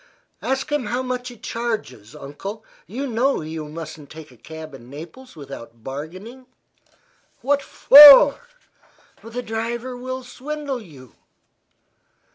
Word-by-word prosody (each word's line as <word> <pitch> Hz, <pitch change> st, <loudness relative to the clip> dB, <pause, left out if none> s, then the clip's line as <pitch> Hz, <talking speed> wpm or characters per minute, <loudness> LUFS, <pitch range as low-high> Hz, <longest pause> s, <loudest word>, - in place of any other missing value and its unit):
"Ask 265 Hz, +2 st, -2 dB
him 295 Hz, -4 st, -1 dB
how 250 Hz, +2 st, -2 dB
much 250 Hz, -1 st, -4 dB
he 245 Hz, -1 st, -10 dB
charges, 215 Hz, -, -5 dB
Uncle. 195 Hz, +10 st, -8 dB, 0.2 s
You 255 Hz, +8 st, -5 dB
know 255 Hz, 0 st, 0 dB
you 155 Hz, 0 st, -6 dB
mustn't 155 Hz, -2 st, -9 dB
take 155 Hz, -3 st, -12 dB
a -, -, -18 dB
cab 160 Hz, +4 st, -11 dB
in 125 Hz, -2 st, -13 dB
Naples 170 Hz, -, -12 dB
without 115 Hz, -6 st, -11 dB
bargaining." 185 Hz, -, -9 dB, 0.9 s
"Why 280 Hz, +2 st, +1 dB, 0.3 s
not?" 285 Hz, 0 st, +11 dB, 0.8 s
"The 235 Hz, +2 st, -6 dB
driver 235 Hz, +3 st, -4 dB
will 255 Hz, +1 st, -6 dB
swindle 275 Hz, +1 st, -6 dB
you." 140 Hz, -, -15 dB
225 Hz, 120 wpm, -21 LUFS, 155-255 Hz, 0.9 s, not